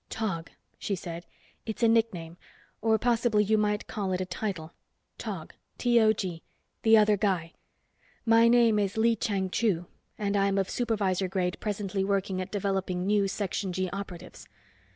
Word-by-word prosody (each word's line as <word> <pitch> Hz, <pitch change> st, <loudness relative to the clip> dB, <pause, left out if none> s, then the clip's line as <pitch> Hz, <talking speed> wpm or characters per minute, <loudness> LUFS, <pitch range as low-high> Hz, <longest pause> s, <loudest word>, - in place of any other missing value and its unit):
"Tog," 175 Hz, -7 st, -3 dB, 0.3 s
she 200 Hz, -, -2 dB
said. 170 Hz, -1 st, -7 dB, 0.4 s
"It's 220 Hz, +1 st, -4 dB
a -, -, +7 dB
nickname, 195 Hz, -8 st, +1 dB, 0.4 s
or 220 Hz, 0 st, +3 dB
possibly 230 Hz, -2 st, +2 dB
you 215 Hz, +2 st, +2 dB
might 210 Hz, -1 st, +1 dB
call 195 Hz, -3 st, -3 dB
it 180 Hz, -, -1 dB
a 185 Hz, -, -1 dB
title. 180 Hz, -3 st, -4 dB, 0.5 s
Tog. -, -, -6 dB, 0.2 s
T 240 Hz, -1 st, +3 dB
O 220 Hz, -1 st, +5 dB
G. 185 Hz, -6 st, -4 dB, 0.4 s
The 225 Hz, 0 st, +6 dB
Other 210 Hz, -1 st, +5 dB
Guy. 185 Hz, -5 st, -1 dB, 0.7 s
My 230 Hz, 0 st, +6 dB
name 235 Hz, -2 st, +5 dB
is 200 Hz, 0 st, -1 dB
Lee 230 Hz, +1 st, +4 dB
Chang 195 Hz, -3 st, -1 dB
Chu, 190 Hz, -6 st, +1 dB, 0.3 s
and 205 Hz, -1 st, -1 dB
I'm 200 Hz, 0 st, +2 dB
of 195 Hz, -1 st, 0 dB
supervisor 200 Hz, -6 st, 0 dB
grade 180 Hz, -1 st, -1 dB
presently 200 Hz, -2 st, -2 dB
working 195 Hz, -1 st, 0 dB
at 185 Hz, -, -6 dB
developing 190 Hz, -3 st, -1 dB
new 205 Hz, 0 st, +2 dB
Section 195 Hz, -1 st, -3 dB
G 185 Hz, 0 st, -2 dB
operatives. 180 Hz, -3 st, -8 dB
200 Hz, 160 wpm, -28 LUFS, 185-220 Hz, 0.7 s, a